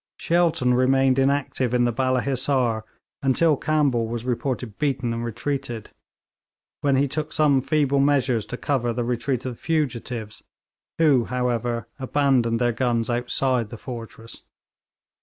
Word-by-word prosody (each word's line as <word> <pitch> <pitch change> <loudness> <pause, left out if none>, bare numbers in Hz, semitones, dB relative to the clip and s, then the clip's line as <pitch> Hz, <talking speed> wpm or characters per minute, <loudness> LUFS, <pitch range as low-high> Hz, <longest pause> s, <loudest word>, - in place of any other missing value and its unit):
Shelton 165 -7 +2
remained 130 +1 +3
inactive 135 -2 +1
in 120 0 +3
the 120 - +1
Balla 130 +1 +1
Hissar 130 -4 0 0.4
until 145 +4 +3
Campbell 140 -6 +1
was 120 +1 -4
reported 125 -3 -3
beaten 135 -5 0
and 115 0 -3
retreating, 120 -1 -3 1.0
when 140 -2 +2
he 140 +2 +2
took 150 +3 -3
some 145 -4 +3
feeble 140 0 +1
measures 135 -5 +2
to 125 - -5
cover 125 -5 -1
the 120 +1 -2
retreat 120 +1 -2
of 130 - -3
the - - -18
fugitives, 125 -8 -2 0.6
who, 145 -7 +4
however, 120 -2 -1
abandoned 130 -4 +2
their 120 -1 +1
guns 120 -1 0
outside 125 -1 0
the 115 - -8
fortress. 115 -2 -9
130 Hz, 140 wpm, -24 LUFS, 120-140 Hz, 1.0 s, who